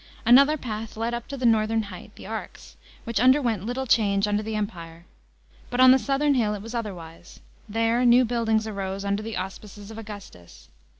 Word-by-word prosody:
Another 275 +6 +6
path 220 -4 -6
led 230 +2 -2
up 235 0 -5
to 280 - -6
the 255 - -3
northern 225 -1 +2
height, 200 -3 -11
the - - -12
Arx, - - -8 0.3
which 230 -2 -2
underwent 245 -5 +3
little 260 +2 -3
change 205 -4 +2
under 205 0 0
the 220 0 -4
Empire. 170 -5 -6 0.6
But 245 - -3
on 255 0 +8
the 265 - +5
southern 275 +5 +1
hill 220 -5 +1
it 200 - -7
was 225 +2 -8
otherwise; 175 -7 -7 0.3
there 230 +3 +1
new 245 +1 +5
buildings 225 -2 0
arose 195 -2 -4
under 200 +1 -1
the 225 0 -5
auspices 200 +2 -8
of 220 - -8
Augustus. 205 - -12
220 Hz, 185 wpm, -25 LUFS, 200-240 Hz, 0.6 s, on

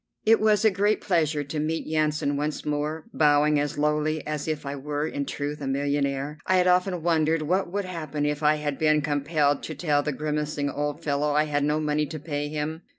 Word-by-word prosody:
It 225 +1 +5
was 215 0 +3
a 220 - +6
great 205 +2 +1
pleasure 155 -5 +1
to 145 +2 -4
meet 160 +2 -2
Yansan 155 -2 0
once 150 +1 -3
more, 150 +1 -2
bowing 150 0 +4
as 145 0 -2
lowly 150 +1 0
as 150 0 -3
if 155 -2 -3
I 140 +1 -3
were 145 +2 -3
in 140 -3 -3
truth 145 +1 -4
a 140 - -3
millionaire. 140 +1 -1
I 185 - +3
had 180 - +3
often 180 -1 +2
wondered 160 -1 +2
what 180 +3 0
would 200 0 -2
happen 155 -5 -3
if 150 0 -1
I 150 0 +4
had 150 -2 -3
been 155 -1 +3
compelled 145 0 +1
to 155 - -6
tell 145 -1 +1
the 150 - -2
grimacing 150 0 -2
old 145 +3 -3
fellow 145 0 0
I 150 +1 +4
had 145 -1 -1
no 150 +1 +1
money 150 0 0
to 155 +2 -6
pay 145 -1 -3
him. 155 +2 -3
150 Hz, 215 wpm, -26 LUFS, 145-160 Hz, -, a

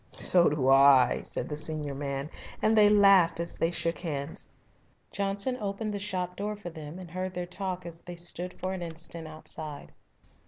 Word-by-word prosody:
"So 175 -2 +6
do 145 -3 0
I," 135 -1 +6
said - - -3
the 150 - -4
senior 150 -1 -4
man, 140 +1 -4 0.3
and 220 +1 +3
they 210 -1 +7
laughed 195 -5 +6
as 170 - -4
they 165 - +2
shook 170 -1 -1
hands. 145 -3 -4 0.6
Johnson 200 +5 -1
opened 205 +1 -3
the 205 - -3
shop 180 -3 -3
door 210 +2 -3
for 200 -4 -8
them 155 0 -8
and 180 -3 -10
heard 185 +1 -4
their 180 0 -2
talk 185 0 -5
as 170 -1 -8
they 175 - -8
stood 175 +1 -4
for 185 +1 -2
an 185 - -5
instant 165 -1 -5
outside. 155 -1 -7
175 Hz, 185 wpm, -29 LUFS, 155-190 Hz, 0.6 s, they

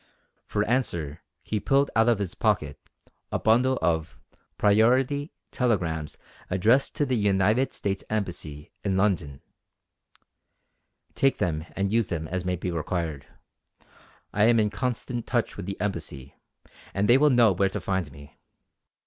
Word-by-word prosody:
For 105 0 0
answer 85 - -1 0.2
he 105 - -2
pulled 140 +6 +2
out 115 +1 +4
of 115 - +3
his 100 -3 -3
pocket - - 0 0.5
a - - +1
bundle 125 +4 +3
of 80 -1 -1 0.4
"priority" 125 +8 +3 0.2
telegrams 85 - -1 0.3
addressed 115 +9 +2
to 145 - +1
the 130 -2 0
United 105 +4 +2
States 100 -1 -3
Embassy 85 -8 -3
in 95 -2 0
London. 90 -9 0 1.7
"Take 135 0 +2
them 80 -1 -2
and 100 +1 -1
use 115 -3 +2
them 80 -2 -3
as 90 +1 -2
may 90 0 0
be 90 +1 -4
required. 80 -4 -3 1.1
I 105 +1 +3
am 115 0 +5
in 105 -1 +1
constant 120 +1 -3
touch 120 -2 0
with 95 -2 -7
the 100 - -5
Embassy 75 -9 -4 0.6
and 100 +1 +1
they 125 +3 +6
will 150 +1 +5
know 120 -5 +5
where 95 +1 +1
to - - -4
find 95 -6 -2
me. 70 +1 -15
100 Hz, 145 wpm, -26 LUFS, 85-120 Hz, 1.7 s, they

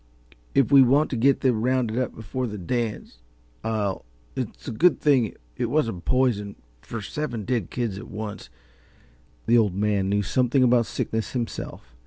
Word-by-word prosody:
"If 135 0 +3
we 140 -1 +9
want 140 +4 +4
to - - -1
get 135 +4 +3
them 125 -5 +2
rounded 125 -1 +1
up 130 - -2
before 125 +4 -4
the 105 -2 -6
dance, 105 - -3 0.4
I'll 105 -3 -1 0.3
it's - - -5
a - - -2
good 170 +10 +3
thing 130 -7 +2 0.2
it - - 0
wasn't 115 - -1
poison, 120 -6 +1 0.3
for 115 -3 -6
seven 120 -3 -4
dead 120 -8 -1
kids 115 -6 -3
at - - -9
once 105 -1 -6 0.5
" - - -32
The 120 +1 +5
Old 105 -5 +1
Man 100 -1 +1
knew 100 +1 +1
something 125 +7 +2
about 120 -2 +4
sickness 110 -1 -3
himself. 120 - -5
115 Hz, 170 wpm, -25 LUFS, 105-130 Hz, 0.5 s, we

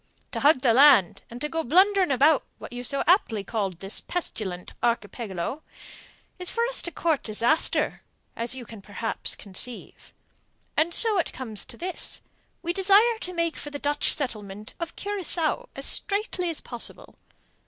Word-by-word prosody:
To - - -3
hug 285 -2 +4
the 245 -4 +4
land, 255 - +6
and 240 - -9
go 325 0 -1
blundering 375 +6 +4
about 285 +2 +4
what - - -10
you 245 0 -6
so 275 +3 0
aptly 245 - +3
call 205 -2 -2
this 195 +3 -3
pestilent 195 - -5
archipelago, 225 - -2 0.8
is 360 - -1
for 465 - 0
us - - +1
to 345 - -5
court 320 -2 0
disaster, 235 +8 +2 0.3
as 235 +2 -2
you 250 -2 -8
can 220 -2 -11
perhaps 210 +3 -2
conceive. 210 +5 -5 0.6
And 320 +2 +2
so 430 +2 +5
it 340 - -1
comes 225 -5 -6
to - - -10
this: 365 +1 -4 0.4
We 345 0 -1
desire 405 +5 +4
to 365 - -6
make 335 -2 -1
for 295 - -6
the 290 - -6
Dutch 290 +1 +1
settlement 215 -7 -5
of 335 - -5
Curacao 400 +3 0
as - - -4
straightly 400 -3 0
as 325 - -3
possible. 240 -2 -9
285 Hz, 160 wpm, -26 LUFS, 225-355 Hz, 0.8 s, land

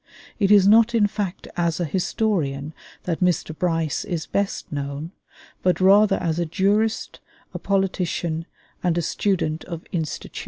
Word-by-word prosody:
It 200 -2 +2
is 200 -2 +6
not 225 +3 +5
in 215 -3 +4
fact 200 -3 -3
as 170 -1 0
a 175 - 0
historian 155 -4 -1 0.3
that 170 -3 -2
Mr. 175 -3 0
Bryce 165 -3 -1
is 165 -3 -3
best 200 0 -2
known, 145 +2 -4 0.5
but 180 -2 +2
rather 195 +2 +5
as 165 -1 -1
a 170 - +1
jurist, 205 +6 0 0.3
a - - -5
politician, 180 -4 -1 0.3
and 175 -2 +1
a 170 - 0
student 165 -3 -1
of 170 -1 -7
institutions. 160 -4 -4
175 Hz, 150 wpm, -23 LUFS, 160-200 Hz, 0.5 s, is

